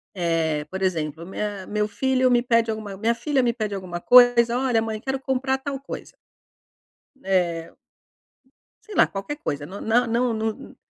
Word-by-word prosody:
Eh 165 -4 0
por 190 +3 -7
exemplo, 165 -3 -2
minha 200 +1 -4
meu 210 0 0
filho 255 +4 +1
me 240 -1 +4
pede 230 -2 +2
alguma 215 -2 -6
minha 230 +3 +1
filha 275 +1 0
me 235 -1 +2
pede 215 -4 -3
alguma 180 -3 -5
coisa, 245 0 +6
"Olha, 245 -4 +2
mãe 220 -1 -3
quero 265 +1 -2
comprar 265 0 0
tal 270 0 -5
coisa." 275 - -8 1.1
Eh 175 -3 0 1.1
Sei 425 - -10
lá - - +5
qualquer 200 +10 -5
coisa, 145 - -4
não 200 +4 -9
não 240 +2 +2
não 235 +1 +1
não, 220 -1 -4
220 Hz, 165 wpm, -24 LUFS, 190-250 Hz, 1.1 s, coisa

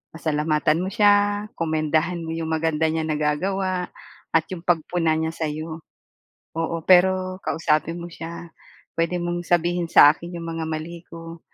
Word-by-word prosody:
Pasalamatan 155 0 +1
mo 185 - -2
siya, 205 0 +3
komendahan 160 +1 0
mo 160 - -5
'yong 165 0 -3
maganda 160 0 +1
niya 160 0 -1
nagagawa 180 +5 -1 0.4
at 165 - +3
'yong 175 -3 -6
pagpuna 165 -1 +1
niya 160 +1 -2
sa'yo. 160 +1 -4 0.7
Oo, 165 0 -2
pero 185 +1 +4
kausapin 160 0 0
mo 170 0 -8
siya. 170 +1 -8 0.5
"Puwede 170 +2 +1
mong 175 0 -3
sabihin 175 0 +1
sa 145 -3 +8
akin 170 +3 -9
'yong 165 -1 -6
mga 160 - -2
mali 160 +2 -5
ko 165 0 -10
165 Hz, 145 wpm, -23 LUFS, 160-175 Hz, 0.7 s, sa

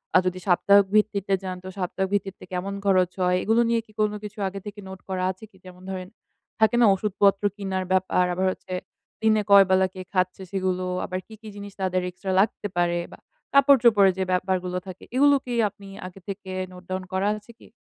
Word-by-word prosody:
আ - - +10
যদি 185 0 -1
সাপ্তাহিক 200 +2 +5
ভিত্তিতে 205 -2 +2
যান, 185 -1 -4
তো - - -8
সাপ্তাহিক 190 +1 -2
ভিত্তিতে 195 -1 -2
কেমন 185 +2 -3
খরচ 185 -2 +3
হয়? 180 0 +3
এগুলো 225 +2 +3
নিয়ে 230 -1 +2
কি 215 - -21
কোন 210 -1 +2
কিছু 210 +1 -8
আগে 195 +1 -5
থেকে 205 0 -8
নোট 190 0 -9
করা 185 -1 -2
আছে 190 +3 -14
কি? 190 - -21
যেমন 180 0 -13
ধরেন 185 -1 -5 0.5
থাকে 220 +2 +4
না? - - +7
ওষুধপত্র 200 0 +1
কিনার 190 -2 -3
ব্যাপার, 185 -1 +2
আবার 185 +2 0
হচ্ছে 185 - -8 0.5
দিনে 220 -1 +3
কয় 200 -1 +9
বেলা 190 0 +4
কে 185 - -7
খাচ্ছে? 185 0 0
সেগুলো, 185 -1 -1 0.2
আবার 185 0 -3
কি, 220 - -13
কি 220 - -11
জিনিস 205 -1 -9
তাদের 185 -1 0
এক্সট্রা 190 +2 -5
লাগতে 205 +1 +1
পারে? 175 0 +2
বা, - - -13 0.3
কাপড় 280 0 +7
চোপড়ের 205 -5 +6
যে 190 - 0
ব্যাপারগুলো 180 0 0
থাকে, 185 -1 -9
এগুলো 285 +2 +6
কি 245 - -4 0.2
আপনি 200 0 -15 0.2
আগে 185 +1 -12
থেকে 195 -1 -6 0.2
নোট 180 0 -12
ডাউন 185 0 -3
করা 190 +2 +1
আছে 210 +3 -16
কি? - - -16
190 Hz, 205 wpm, -25 LUFS, 185-205 Hz, 0.5 s, আ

